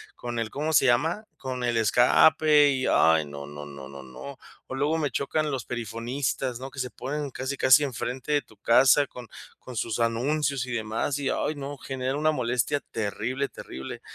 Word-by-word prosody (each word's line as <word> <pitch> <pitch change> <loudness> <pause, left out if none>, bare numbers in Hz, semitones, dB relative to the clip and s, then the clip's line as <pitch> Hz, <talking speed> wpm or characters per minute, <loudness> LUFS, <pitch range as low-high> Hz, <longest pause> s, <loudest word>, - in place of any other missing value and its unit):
con 120 -1 -5
el, 115 -1 -2
¿cómo 150 +3 -2
se 135 - +5
llama?, 160 - +2
con 130 -2 -5
el 120 -1 +1
escape 145 +6 +5
y 130 -2 0
ay, 80 -1 +4
no, 70 -1 -8
no, 75 0 -8
no, 70 -2 -10
no, 70 -1 -10
no. 65 - -10 0.3
O 130 - -5
luego 145 +4 +1
me 150 -2 0
chocan 150 +4 -1
los 130 -5 -3
perifonistas, 125 +2 -3
¿no?, 135 +1 -6
que 130 - -16
se 125 -1 -3
ponen 140 +5 -4
casi, 130 +3 -4
casi 130 +4 +6
enfrente 130 +1 -3
de 145 - +3
tu 110 - -21
casa 130 +6 +5
con 125 -1 -11 0.3
con 125 - -10
sus 110 -1 -2
anuncios 130 +3 0
y - - -5
demás, 115 +5 -1
y, 140 - -1
ay 155 - -1
no, 140 0 -6
genera 130 +1 -3
una 155 +1 +2
molestia 125 +2 0
terrible, 115 +6 -2
terrible. 65 - -8
130 Hz, 190 wpm, -26 LUFS, 115-140 Hz, 0.3 s, casi